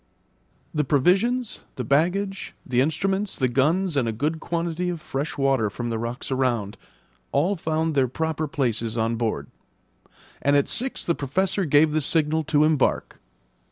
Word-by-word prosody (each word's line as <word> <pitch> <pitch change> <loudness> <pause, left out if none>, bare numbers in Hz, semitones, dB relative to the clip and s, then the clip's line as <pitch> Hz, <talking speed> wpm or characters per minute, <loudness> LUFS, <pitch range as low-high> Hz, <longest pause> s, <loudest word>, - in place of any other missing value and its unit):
The 150 - +1
provisions, 195 - +2 0.2
the 130 - -3
baggage, 180 - 0
the 125 -1 +2
instruments, 190 +7 0
the 130 - +2
guns, 155 +8 +1
and 130 -4 +1
a - - 0
good 150 +8 -2
quantity 170 +1 -2
of 175 -2 -3
fresh 145 0 -4
water 135 -6 +2
from 120 +3 -4
the 115 - -2
rocks 120 +4 -4
around, 120 -6 0 0.6
all 170 +9 +2
found 160 -1 -1
their 135 -3 +3
proper 155 +4 -2
places 120 -6 -1
on 115 +1 +1
board; 110 -11 -2 1.0
and 140 +1 +3
at 140 - +2
six 260 +2 -1
the 170 - +2
Professor 185 +7 0
gave 150 +1 +4
the 155 +1 +1
signal 160 +1 +1
to 150 -1 +3
embark. 155 -3 +1
150 Hz, 155 wpm, -24 LUFS, 130-170 Hz, 1.0 s, gave